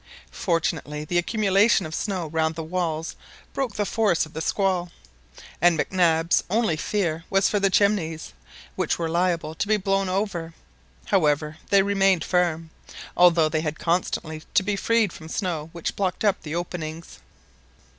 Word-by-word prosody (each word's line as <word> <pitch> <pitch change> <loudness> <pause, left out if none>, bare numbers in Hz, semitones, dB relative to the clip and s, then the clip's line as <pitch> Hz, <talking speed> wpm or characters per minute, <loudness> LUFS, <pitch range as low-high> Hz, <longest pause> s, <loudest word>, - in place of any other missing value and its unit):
Fortunately 160 -3 -2
the 175 +3 +1
accumulation 200 +1 +2
of 155 - -7
snow 185 -1 -2
round 160 0 -1
the 165 - -4
walls 165 -1 -3 0.4
broke 260 -6 -2
the 210 - 0
force 205 -7 +1
of 155 - -16
the 160 - -4
squall, 180 -1 0 0.7
and 175 -1 +5
Mac 145 - -2
Nabs 170 -3 +3
only 215 -4 +1
fear 165 -1 -2
was 195 0 +3
for 205 - +1
the 195 0 +2
chimneys, 185 -6 +1 0.4
which - - 0
were 165 - -2
liable 170 -2 0
to 195 - -3
be 215 0 +3
blown 195 -1 0
over. 185 -4 -2 0.5
However, 155 -4 +1
they 200 -1 +5
remained 195 -3 +2
firm, 165 -3 0 0.4
although 170 -3 +5
they 155 0 -1
had 155 -1 -3
constantly 165 -2 -1
to 195 - +5
be 205 +1 -1
freed 225 -1 +1
from 160 -2 -10
the - - -7
snow 165 -6 -2
which 170 -1 -4
blocked 190 +1 -1
up 205 -1 +2
the 155 +1 -5
openings. 170 -2 -6
175 Hz, 165 wpm, -24 LUFS, 160-195 Hz, 0.7 s, and